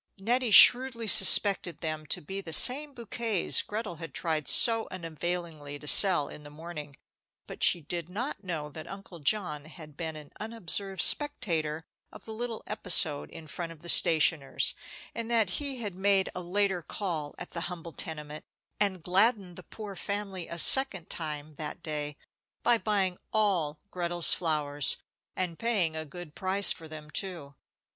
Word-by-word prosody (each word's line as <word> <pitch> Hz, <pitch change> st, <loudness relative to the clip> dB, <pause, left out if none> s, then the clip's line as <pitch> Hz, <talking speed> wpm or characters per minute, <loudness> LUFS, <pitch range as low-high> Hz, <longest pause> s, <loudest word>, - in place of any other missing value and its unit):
Nettie 240 Hz, +5 st, -2 dB
shrewdly 245 Hz, +2 st, +6 dB
suspected 195 Hz, -3 st, +5 dB
them 155 Hz, -2 st, -6 dB
to -, -, -3 dB
be 195 Hz, +6 st, -8 dB
the 165 Hz, -4 st, -7 dB
same 275 Hz, -, +6 dB
bouquets 230 Hz, -4 st, -1 dB
Gretel 210 Hz, -5 st, -7 dB
had 165 Hz, -3 st, -10 dB
tried 160 Hz, -3 st, -2 dB
so 225 Hz, -1 st, +3 dB
unavailingly 165 Hz, -3 st, -7 dB
to 150 Hz, -, -15 dB
sell 175 Hz, -2 st, +8 dB
in -, -, -12 dB
the 145 Hz, -, -13 dB
morning; 150 Hz, -2 st, -11 dB, 0.5 s
but -, -, -12 dB
she 175 Hz, -, +4 dB
did 170 Hz, +2 st, -6 dB
not 215 Hz, +2 st, -6 dB
know 165 Hz, -5 st, -6 dB
that 155 Hz, +1 st, -11 dB
Uncle 195 Hz, -3 st, -11 dB
John 150 Hz, -3 st, -2 dB
had 155 Hz, -2 st, -15 dB
been 160 Hz, -1 st, -7 dB
an 150 Hz, -1 st, -13 dB
unobserved 200 Hz, -4 st, -3 dB
spectator 165 Hz, -, -2 dB, 0.3 s
of -, -, -15 dB
the 220 Hz, -, -9 dB
little 230 Hz, 0 st, -7 dB
episode 170 Hz, -8 st, +1 dB
in 165 Hz, -, -13 dB
front 165 Hz, +2 st, -7 dB
of 165 Hz, -1 st, -16 dB
the 170 Hz, -, -6 dB
stationer's, 155 Hz, -4 st, +2 dB, 0.4 s
and 230 Hz, 0 st, -6 dB
that 225 Hz, -6 st, +1 dB
he 280 Hz, -2 st, -5 dB
had 205 Hz, -3 st, -5 dB
made 190 Hz, +1 st, 0 dB
a 180 Hz, -, -7 dB
later 190 Hz, 0 st, -2 dB
call 165 Hz, -6 st, -6 dB
at 175 Hz, -, -9 dB
the 170 Hz, -, -6 dB
humble 170 Hz, -2 st, -9 dB
tenement, 150 Hz, -1 st, -8 dB, 0.4 s
and 190 Hz, -5 st, -2 dB
gladdened 195 Hz, 0 st, 0 dB
the 185 Hz, -, -11 dB
poor 205 Hz, +1 st, -11 dB
family 195 Hz, -2 st, -6 dB
a 170 Hz, -, -8 dB
second 195 Hz, -5 st, +7 dB
time 150 Hz, -2 st, -5 dB
that 150 Hz, -1 st, -8 dB
day 150 Hz, -2 st, -6 dB, 0.5 s
by 235 Hz, -1 st, +2 dB
buying 195 Hz, -5 st, -2 dB
all 185 Hz, -9 st, -1 dB
Gretel's 175 Hz, -1 st, +3 dB
flowers, 150 Hz, -4 st, 0 dB, 0.4 s
and 180 Hz, -3 st, -5 dB
paying 200 Hz, -9 st, -2 dB
a 160 Hz, 0 st, -6 dB
good 160 Hz, +1 st, -12 dB
price 190 Hz, +3 st, +2 dB
for 160 Hz, -, -6 dB
them, 155 Hz, -1 st, -12 dB
too. 160 Hz, -3 st, -6 dB
175 Hz, 165 wpm, -27 LUFS, 155-205 Hz, 0.5 s, sell